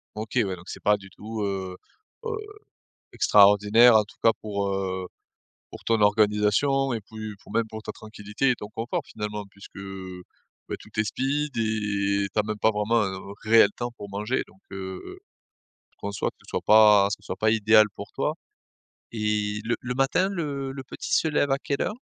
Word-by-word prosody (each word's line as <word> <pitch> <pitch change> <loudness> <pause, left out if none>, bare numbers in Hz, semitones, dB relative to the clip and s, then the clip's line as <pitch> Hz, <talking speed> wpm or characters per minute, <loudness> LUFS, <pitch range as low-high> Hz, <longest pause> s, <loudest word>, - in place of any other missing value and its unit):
OK. 110 +3 -6
Ouais, 100 -6 +1
donc 90 +1 -15
c'est - - -8
pas 105 0 +4
du 100 -1 -14
tout, 110 +2 -6
heu 95 -2 -3 0.5
heu, 460 - -3 0.8
extraordinaire, 105 +4 +6
en 110 - +6
tout 105 - -17
cas 115 - +7
pour, 100 -2 -2
heu, 95 -1 -3 0.6
pour - - -11
ton 115 -1 +2
organisation 105 +6 +3
et 115 - -2
puis, 110 0 -8
pour - - -13
même 115 -1 +1
pour 110 0 -7
ta - - -6
tranquillité 110 +4 -3
et 125 - 0
ton 105 - -8
confort 115 +2 -3
finalement, 105 -1 -5
puisque, 100 0 -15 0.9
bah, - - -3
tout - - -15
est - - +4
speed 140 +5 -2
et 100 -3 0
tu - - +1
as 105 - +3
même 105 0 -4
pas 110 - +4
vraiment 110 +2 +1
un 95 -1 -3 0.2
réel 110 -1 +6
temps 120 0 -3
pour 100 - -8
manger. 105 +6 -2
Donc 95 - -22
heu, 95 -1 -7 0.7
je - - -35
conçois 100 0 -3
que - - -41
ce - - -22
soit - - -2
pas 105 -2 +7
ce 105 - -4
soit 95 - -5
pas 110 - +2
idéal 110 0 +5
pour - - -9
toi. - - -1 0.8
Et 105 -1 -1
le 120 +2 0
le 125 0 -4
matin, 135 +8 +2
le 140 -7 -3
le 135 0 -7
petit - - -7
se 160 - +2
lève 145 -2 +1
à 135 - +2
quelle 140 -1 -2
heure? - - -2
105 Hz, 195 wpm, -25 LUFS, 100-115 Hz, 0.9 s, cas